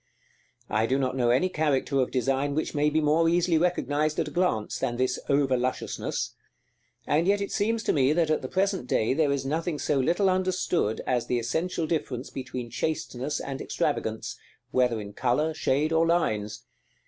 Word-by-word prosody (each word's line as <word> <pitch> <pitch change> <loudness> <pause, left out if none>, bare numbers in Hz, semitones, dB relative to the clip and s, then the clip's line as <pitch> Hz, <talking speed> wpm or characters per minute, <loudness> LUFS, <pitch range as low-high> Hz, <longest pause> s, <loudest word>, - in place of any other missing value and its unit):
I 110 +2 +1
do 130 - +1
not 130 -1 -1
know 120 -2 +2
any 130 +9 +3
character 150 -5 0
of 130 - +1
design 135 +2 0
which 155 - -1
may 150 0 +2
be 155 +1 +1
more 160 +2 +3
easily 170 -1 +2
recognized 155 -3 0
at 160 -2 0
a - - -14
glance 145 -11 0
than 120 - -1
this 130 0 0
over 140 -2 +3
lusciousness; 125 +1 -2 0.7
and 160 +4 +2
yet 200 +1 +3
it 200 - -3
seems 220 +2 0
to - - +1
me 135 -2 +3
that 160 0 +2
at 155 - +1
the 130 - -4
present 190 -4 0
day 110 0 +1
there 150 0 +2
is 140 -1 -1
nothing 160 +3 -1
so 145 -1 0
little 175 +9 +2
understood 185 - 0
as 125 -2 0
the 125 - +1
essential 160 +9 -1
difference 140 -6 -3
between 125 -2 -6
chasteness 145 +1 -2
and 135 -1 -5
extravagance, - - -2 0.3
whether 125 -3 +2
in 100 -1 -8
color, 140 +8 +1
shade, 155 0 0
or 165 +1 +3
lines. 110 -9 0
145 Hz, 185 wpm, -27 LUFS, 125-165 Hz, 0.7 s, any